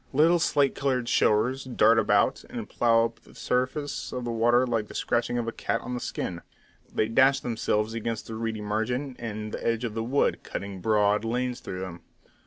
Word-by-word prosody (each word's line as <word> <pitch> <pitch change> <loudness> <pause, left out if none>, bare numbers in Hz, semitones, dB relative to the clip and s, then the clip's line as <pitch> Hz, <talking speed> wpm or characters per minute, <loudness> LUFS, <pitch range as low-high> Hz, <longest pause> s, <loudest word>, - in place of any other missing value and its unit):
Little 165 +5 +5
slate 140 -3 +2
coloured 130 -3 -1
showers 125 +7 +2
dart 115 -3 +4
about, 110 - +2
and - - -6
plough 115 -1 +3
up 115 - -6
the - - -20
surface 130 +4 -2
of 125 -1 -4
the 120 - -2
water 120 +2 +3
like 115 -4 -1
the - - -12
scratching 120 +1 0
of 120 -1 -2
a - - -1
cat 115 - -2
on 125 - -5
the 125 - -2
skin; 85 -6 -4 0.5
they 110 - +1
dash 135 +4 +4
themselves 110 -2 -1
against 115 -1 -3
the 115 - -7
reedy 110 -1 -3
margin 125 +6 -2
and 110 -2 -5
the - - -5
edge 115 0 0
of 115 -3 -3
the 115 0 -2
wood, 130 +5 +1
cutting 100 -2 -6
broad 105 0 +2
lanes 125 +2 -1
through 90 0 -6
them. 90 -2 -7
115 Hz, 195 wpm, -27 LUFS, 110-125 Hz, 0.5 s, Little